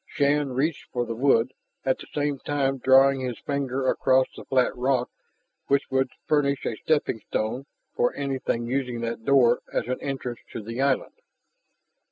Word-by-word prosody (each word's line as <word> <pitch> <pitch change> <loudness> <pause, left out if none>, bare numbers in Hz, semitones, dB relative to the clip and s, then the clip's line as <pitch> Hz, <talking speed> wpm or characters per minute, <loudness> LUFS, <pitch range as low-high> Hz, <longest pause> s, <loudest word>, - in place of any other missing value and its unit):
Shann 145 -1 +1
reached 145 +5 -1
for 120 -1 -1
the 115 - -4
wood, 125 0 +2 0.3
at 130 -1 +1
the - - -10
same 145 -2 -1
time 135 -2 -1
drawing 135 +1 +5
his 125 -2 -3
finger 135 -2 -2
across 130 0 +3
the - - -10
flat 130 -2 +2
rock 125 0 0 0.6
which 140 -1 +1
would 130 0 +2 0.2
furnish 140 -2 +1
a 115 - -1
steppingstone 125 -3 -1 0.3
for 245 - +2
anything 135 -4 -2
using 125 -1 -2
that 115 -1 -4
door 125 -3 +4
as - - -1
an 130 - -3
entrance 130 -3 -4
to 110 - -5
the 115 +4 -4
island. 135 -1 +1
130 Hz, 160 wpm, -25 LUFS, 125-140 Hz, 0.6 s, drawing